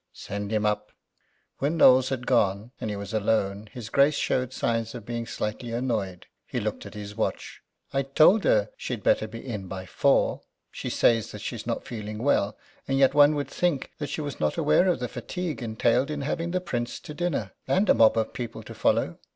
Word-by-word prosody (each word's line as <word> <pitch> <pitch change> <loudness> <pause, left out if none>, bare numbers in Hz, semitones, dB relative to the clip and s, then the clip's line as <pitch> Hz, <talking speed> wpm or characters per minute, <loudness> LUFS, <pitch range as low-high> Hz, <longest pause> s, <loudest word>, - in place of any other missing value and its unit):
"Send 100 +1 -5
him 105 -1 +1
up." 105 0 -1 0.7
When 150 +4 0
Knowles 130 -3 +6
had 130 -2 -3
gone, 105 -2 +1
and 110 - -2
he 105 - -3
was 100 +1 -6
alone, 105 -1 0
his 115 -3 -8
Grace 140 +4 +4
showed 130 -3 0
signs 115 -2 -1
of 115 -4 -8
being 115 0 -4
slightly 110 +3 -4
annoyed. 110 -7 -2 0.2
He - - -2
looked - - -4
at - - -12
his 105 0 -7
watch. 110 - -3 0.3
"I 135 - +2
told 155 +10 +5
her - - +3
she'd - - -5
better - - +3
be - - -9
in 105 -7 -5
by 95 0 -6
four. - - +2 0.3
She - - -5
says 115 -2 +2
that 105 - -8
she's 115 0 -5
not 115 - -2
feeling 105 -4 -6
well, 105 -7 +2 0.3
and 135 - +1
yet 135 -1 +5
one 145 +1 +6
would 145 -1 -2
think 175 -7 -1
that 145 -3 -3
she 155 - -3
was 145 -2 -5
not 75 -1 0
aware 130 - +4
of 180 - +2
the 125 - -3
fatigue 150 - -5
entailed 120 +3 +1
in 150 -1 -3
having 165 +4 -2
the 180 +1 -1
Prince 120 -9 -3
to 150 - -8
dinner, 150 - -2 0.2
and 195 +3 +2
a - - +7
mob 110 0 +5
of 110 -1 0
people 120 -4 -6
to - - -9
follow. - - +1
120 Hz, 210 wpm, -26 LUFS, 105-145 Hz, 0.7 s, a